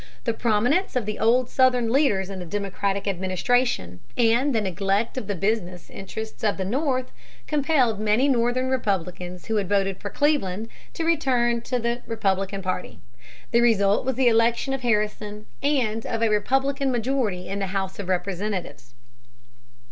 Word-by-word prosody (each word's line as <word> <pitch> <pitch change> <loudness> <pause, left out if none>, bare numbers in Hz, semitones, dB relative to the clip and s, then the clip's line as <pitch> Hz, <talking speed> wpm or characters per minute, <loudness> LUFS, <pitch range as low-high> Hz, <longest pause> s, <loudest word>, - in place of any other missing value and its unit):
The 230 - 0
prominence 240 - +1
of 250 -4 0
the 215 0 -4
old 240 +3 +3
Southern 250 -3 +3
leaders 210 -9 +2
in 190 - -6
the 180 - -6
Democratic 200 +1 -2
administration, 185 - 0 0.2
and 240 +3 +3
the - - +4
neglect 195 +2 -1
of 255 -6 -4
the 205 - -1
business 185 -2 -2
interests 220 +4 -7
of 210 -2 +1
the 190 - -2
North, 255 +3 -1 0.3
compelled 275 -7 +2
many 215 +5 +2
Northern 250 0 +1
Republicans 180 -6 -2
who 220 - -1
had 195 -3 -1
voted 195 -2 +1
for 205 - -4
Cleveland 225 -7 0 0.3
to 330 - -2
return 250 -7 +2
to 250 +2 -2
the 235 +1 -1
Republican 195 -3 -1
party. 185 0 -4 0.5
The 235 - +4
result 205 -4 +3
was 265 0 -1
the 260 0 +3
election 235 +3 +3
of 270 - -3
Harrison 210 -2 -1 0.2
and 245 -6 +1
of 230 -1 -1
a 225 - +3
Republican 270 +6 +1
majority 235 -7 -1
in 195 +1 -3
the 195 - -1
House 190 0 -3
of 195 -2 -5
Representatives. 185 - -3
220 Hz, 160 wpm, -24 LUFS, 195-250 Hz, 0.5 s, the